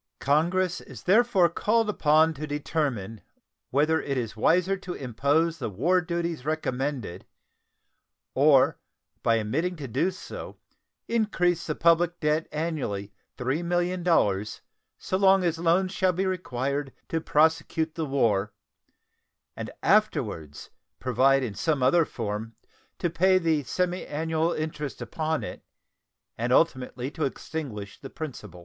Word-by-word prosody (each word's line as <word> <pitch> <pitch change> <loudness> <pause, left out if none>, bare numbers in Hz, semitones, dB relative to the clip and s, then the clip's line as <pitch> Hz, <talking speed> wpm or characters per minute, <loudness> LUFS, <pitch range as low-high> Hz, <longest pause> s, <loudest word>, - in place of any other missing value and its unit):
Congress 175 +5 +1
is - - -12
therefore 200 -2 +4
called 215 +7 +1
upon 160 -4 +3
to 155 +1 -6
determine 135 -8 -2 0.5
whether 155 +4 +2
it 140 -2 -2
is 115 -3 -3
wiser 180 - +3
to 180 -2 -7
impose 145 +7 0
the 125 - -3
war 165 - +2
duties 170 -4 -3
recommended 135 - -3 1.1
or 135 -1 +4 0.4
by 115 -1 +3
omitting 160 +12 -1
to 145 -4 -7
do 135 +10 +1
so 190 0 -8 0.5
increase 180 -7 +1
the 155 - -1
public 170 +1 +3
debt 155 +1 +1
annually 135 -11 -3 0.2
$3,000,000 170 - 0 0.4
so 185 - -2
long 195 -1 +5
as 165 -2 0
loans 175 +3 +2
shall 185 -2 +1
be 190 +3 -1
required 140 -6 -2 0.2
to 165 - -2
prosecute 160 +1 +1
the 160 -2 -3
war, 110 -7 +1 1.0
and - - -5
afterwards 120 - 0 0.3
provide 130 +2 +3
in 115 -5 -3
some 140 +5 0
other 160 +6 +4
form 110 -1 -5 0.4
to - - 0
pay 185 +3 +3
the 165 -4 +1
semiannual 160 0 -1
interest 150 -2 -4
upon 155 +7 -2
it, - - -7 0.8
and 120 +2 -1
ultimately 130 -2 +1
to 160 0 -4
extinguish 130 -8 -5
the 135 - -9
principal. 115 - -8
155 Hz, 125 wpm, -26 LUFS, 130-175 Hz, 1.1 s, long